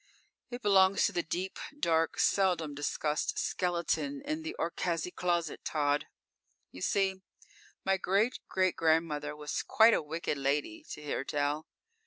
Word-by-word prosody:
"It 245 0 -7
belongs 195 -1 +5
to - - +1
the 175 -3 0
deep, 180 +3 -4 0.2
dark, 165 - +2
seldom 175 -6 +2
discussed 150 +1 -1
skeleton 180 - -1
in 310 +2 -2
the 320 +1 -5
Orcaczy 170 +1 -1
closet, 170 -3 -1
Tod. 145 -1 0 0.6
You 90 - -11
see, 190 - +1 0.6
my 195 0 +3
great 200 +7 +1
great 185 -1 +1
grandmother 160 -2 +1
was 150 0 -3
quite 225 +1 +5
a - - +2
wicked 155 -1 -3
lady, 145 - -1
to 150 - -9
hear 145 -2 -2
tell. 145 +2 -1
170 Hz, 140 wpm, -31 LUFS, 150-195 Hz, 0.6 s, belongs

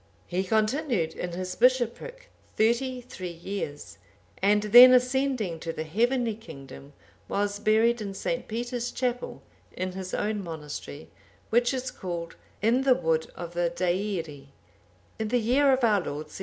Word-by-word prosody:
He 185 +2 -1
continued 220 - 0
in 175 -1 -5
his 185 +1 -4
bishopric 255 - 0 0.3
thirty 250 +3 +1
three 185 -7 -7
years,(791) 170 -3 -6 0.4
and 205 +2 +3
then 250 +1 +11
ascending 250 -8 +1
to 165 +1 -4
the 160 - -5
heavenly 235 +7 +1
kingdom, 140 - -12 0.4
was 205 0 -1
buried 220 +2 +3
in 200 -2 -5
St. 250 +5 -3
Peter's 240 +2 -3
Chapel, 250 -1 -3 0.3
in 185 0 -4
his 185 0 -5
own 210 -1 -2
monastery, 150 -2 -8 0.4
which 240 +1 +3
is 260 -1 -3
called, 170 -2 -6 0.3
"In 235 +4 +3
the 265 -2 +4
wood 160 -5 0
of 175 -1 -7
the 175 0 +1
Deiri,"(792) 175 -5 -2 0.7
in 220 - -1
the 245 +3 +1
year 260 +5 +3
of 260 -1 +1
our 215 -3 +4
Lord 150 -2 -6
721. - - -9
210 Hz, 150 wpm, -27 LUFS, 175-245 Hz, 0.7 s, then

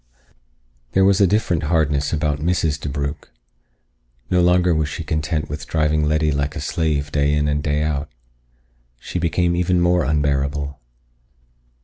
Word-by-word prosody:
There 95 0 +4
was 100 0 +4
a 100 - +6
different 90 -5 +1
hardness 75 -2 +1
about 75 -2 -1
Mrs. 80 -2 0
DeBrugh. 70 +1 -4 1.1
No 90 - +4
longer 90 0 +3
was 80 -2 0
she - - -5
content 75 0 -2
with 75 0 -6
driving 75 -1 +1
Letty 75 0 +1
like 70 +1 -2
a - - -4
slave 75 -1 -1
day 70 0 +1
in 75 0 +1
and 75 0 0
day 75 0 0
out. 75 -1 -2 0.9
She 90 - -5
became 85 +1 +1
even 90 +1 +1
more 85 0 +3
unbearable. 70 -1 -1
75 Hz, 145 wpm, -21 LUFS, 75-85 Hz, 1.1 s, a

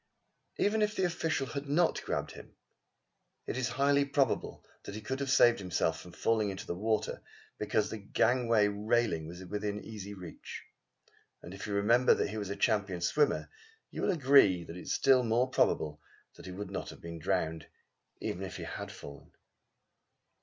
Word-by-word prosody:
Even 215 +2 +2
if 210 0 +1
the 190 - 0
official 165 -5 0
had 140 +1 -5
not 165 +4 +2
grabbed - - -2
him, - - -13 0.9
it - - -3
is 130 -1 0
highly 140 +3 +3
probable 140 -3 0 0.2
that 100 - -7
he 110 - -6
could 130 +5 -3
have 140 -1 -2
saved 120 -3 +5
himself 90 -3 -1
from 90 - -12
falling 110 +2 +1
into 95 -1 -6
the - - -3
water, 110 +4 -1 0.4
because 105 0 0
the 110 - -5
gangway 115 +1 +2
railing 105 -5 0
was 90 +2 -9
in 105 +2 -4
easy 105 -2 -7
reach; 90 -3 -9 0.8
and 90 - -9
if 95 - -7
you 105 - -3
remember 115 +5 +4
that - - -1
he 110 - -5
was 100 -2 -4
a 100 - -3
champion 100 -5 +1
swimmer, 145 - +1 0.4
you - - -5
will - - +1
agree 135 - +5
that 85 - -9
it 90 - -7
is - - -5
still 130 -2 +5
more 120 +2 +2
probable 75 -11 +1 0.3
that - - -12
he - - -6
would 100 +1 -6
not 100 - -4
have - - -11
been 85 0 -8
drowned, 80 0 -1 0.5
even - - -4
if - - -5
he - - -6
had - - -6
fallen. 70 0 -11
105 Hz, 180 wpm, -31 LUFS, 95-130 Hz, 0.9 s, saved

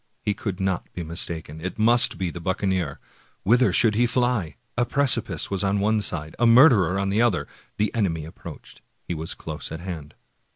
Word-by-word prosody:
He 105 - 0
could 100 -2 -5
not 95 -2 -2
be 90 - -5
mistaken; 80 -1 -4
it 95 +2 -5
must 115 +2 +5
be 90 -3 -2
the 85 - -8
buccaneer. 95 -4 -1 0.4
Whither 120 +7 +4
should 115 -3 +3
he 120 +3 +2
fly? 120 - 0
— - - -45
a 120 - +2
precipice 140 -3 +1
was 100 0 0
on 100 +1 +1
one 105 +2 +1
side, 80 -5 -4
a 120 - +4
murderer 115 - +6
on 100 0 -1
the 105 +3 +1
other. 120 -7 +1 0.3
The 105 +1 0
enemy 85 -9 -1
approached 80 - -11
— - - -45
he - - -2
was 80 0 -5
close - - -7
at 80 - -5
hand. 80 -5 -7
95 Hz, 200 wpm, -24 LUFS, 85-115 Hz, 0.4 s, murderer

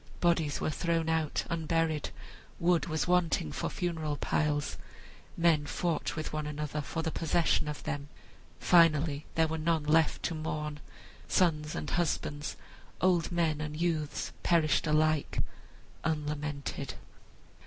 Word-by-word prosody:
Bodies 165 -4 +2
were - - 0
thrown 165 0 0
out 160 -2 0
unburied, 165 -2 0 0.5
wood 175 0 +3
was 155 0 -1
wanting 175 - +2
for - - -2
funeral 160 -4 -2
piles, 145 -1 0 0.6
men 165 -4 +3
fought 170 0 -1
with 155 -1 -4
one 155 -1 -2
another 150 0 -3
for 160 +3 -3
the 160 - -1
possession 165 -1 +1
of 150 -1 -5
them. 140 0 -4 0.5
Finally 155 -4 +4
there 160 0 +4
were 160 0 -3
none 160 -1 +1
left 155 +1 +3
to 170 - 0
mourn; 150 -1 -3 0.5
sons 155 -4 +2
and - - -4
husbands, 150 -3 -1 0.4
old 180 -1 +2
men 165 -3 +1
and 150 0 -4
youths, 160 -4 -1
perished 165 -2 +3
alike 155 0 +2 0.7
unlamented. 150 -2 -3
155 Hz, 130 wpm, -31 LUFS, 150-165 Hz, 0.7 s, Finally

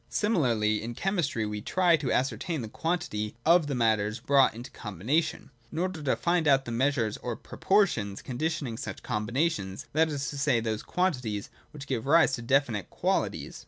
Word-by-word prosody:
Similarly, 115 - +1
in 115 +1 -5
chemistry, 170 - -1
we 105 0 -4
try 180 - +3
to 140 -5 -2
ascertain 145 +3 -1
the - - -5
quantity 160 -8 -2
of 165 -1 +5
the 140 - -2
matters 110 -2 +1
brought 135 -1 +4
into 120 +2 -9
combination, 115 - -2 0.2
in - - -7
order 180 -1 -2
to 140 - +1
find 170 -2 +1
out 135 -1 +4
the 120 - -5
measures 115 -3 +1
or 120 -2 -4
pro - - -12
portions 150 - +2
conditioning 140 -2 -2
such 135 - -6
combinations, 105 - -1
that 160 +2 +3
is 140 -2 -3
to 145 - -6
say, 140 -4 +3
those 110 -1 -2
quantities 125 - -1 0.2
which 145 -2 -9
give 130 -2 -3
rise 160 -1 +5
to 120 - -2
definite 120 -4 +1
qualities. - - -1
135 Hz, 175 wpm, -28 LUFS, 110-160 Hz, 0.2 s, of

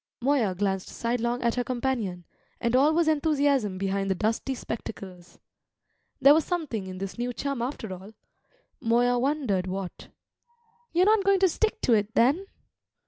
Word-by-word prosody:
Moya 245 -7 +1
glanced 195 0 -1
sidelong 240 +1 -2
at 235 -1 +2
her 250 - -1
companion, 240 -9 -2 0.3
and 235 0 0
all 280 +4 +5
was 330 0 +2
enthusiasm 285 -9 +1
behind 195 +1 -1
the 190 - +1
dusty 225 +7 -1
spectacles. 190 -7 -8 0.8
There 275 +1 +8
was 315 +1 +3
something 285 - -3
in 185 0 -7
this 195 +4 -6
new 245 +1 -1
chum 275 0 -3
after 235 -5 -4
all. 190 +4 -11 0.7
Moya 245 +2 +2
wondered 250 -9 0
what. 185 -1 -6 0.8
"You're 355 +2 +3
not 425 -1 +4
going 395 0 +4
to 380 - +6
stick 435 +6 -1
to 245 - +3
it, 210 +1 +1
then?" 290 +12 +3
240 Hz, 155 wpm, -27 LUFS, 195-285 Hz, 0.8 s, There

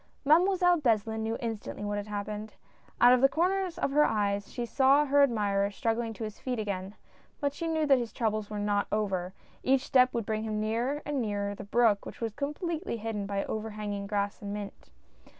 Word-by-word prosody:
Mademoiselle 355 +3 +4
Beslin 220 -3 +1
knew 225 +1 -2
instantly 225 -3 -5
what 205 0 -2
had 205 - -6
hap 205 -1 -3
pened. 210 0 -6 0.5
Out 245 +1 +8
of 250 - +3
the 270 - +6
corners 365 +3 0
of - - -1
her 300 +2 +5
eyes 200 -4 0
she 240 - -3
saw 275 +4 +4
her 285 0 +4
admirer 205 -6 +2
struggling 225 +2 -1
to 225 - -7
his 215 -1 -6
feet 250 -2 -3
again; 200 -2 -4 0.4
but 285 -2 0
she 330 +3 -4
knew 320 -1 +1
that 275 -3 +5
his 235 -2 -4
troubles 215 -3 -1
were 210 - -5
not 205 0 0
over, 195 -4 0
as - - -30
each 265 0 +3
step 255 -1 +4
would 230 -3 -2
bring 215 0 -1
him 215 -1 -2
nearer 235 +7 -1
and 290 -3 -1
nearer 205 -2 -2
the 205 - -8
brook, 215 -1 +3
which - - -9
was 225 -2 -3
completely 300 - -3
hidden 210 -2 -4
by 200 -1 -2
overhanging 210 -2 -4
grass 205 0 -2
and 200 -1 -5
mint. 205 -1 -7
220 Hz, 205 wpm, -29 LUFS, 205-270 Hz, 0.5 s, Out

